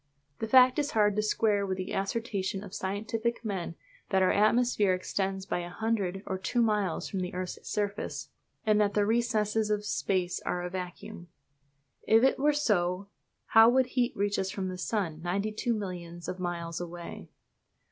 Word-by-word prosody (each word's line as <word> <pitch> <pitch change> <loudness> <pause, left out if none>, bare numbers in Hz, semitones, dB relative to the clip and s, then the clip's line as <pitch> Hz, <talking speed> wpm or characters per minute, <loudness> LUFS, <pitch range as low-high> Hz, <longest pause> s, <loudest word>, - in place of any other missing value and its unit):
This 225 - -3
fact 255 +2 +7
is 290 0 -1
hard 210 -2 +3
to 210 - +2
square 210 -1 +2
with 190 -1 -2
the 185 0 -4
assertion 195 -1 -2
of 195 -2 -10
scientific 220 +5 -2
men 185 -5 -3 0.3
that 190 -1 +3
our 185 - +4
atmosphere 215 -2 +3
extends 190 +1 -2
but 180 - -2
a 175 - -6
hundred 195 -1 -1
or 190 - -3
two 240 +5 +1
miles 210 -6 0
from 195 - -3
the 180 0 -4
earth's 185 0 -5
surface, 205 0 -3 0.4
and 215 -1 +4
that 205 -1 +1
the 205 -1 +3
recesses 220 -1 +1
of 210 0 0
space 185 -3 -1
are 180 - -2
a 180 - -4
vacuum. 180 -1 -7 0.8
If 225 +2 +5
it 265 0 +3
were 295 +2 +4
so, 200 -9 0 0.4
how 225 +1 +7
would 260 +1 +4
heat 245 -1 +1
reach 205 +1 0
us 190 - -1
from 190 -1 -3
the 185 - -5
sun, 180 -6 -2
ninety 195 +5 -1
two 235 +2 -1
millions 175 -4 -6
of 185 - -4
miles 170 -1 -3
away? 175 0 -8
200 Hz, 180 wpm, -29 LUFS, 185-220 Hz, 0.8 s, fact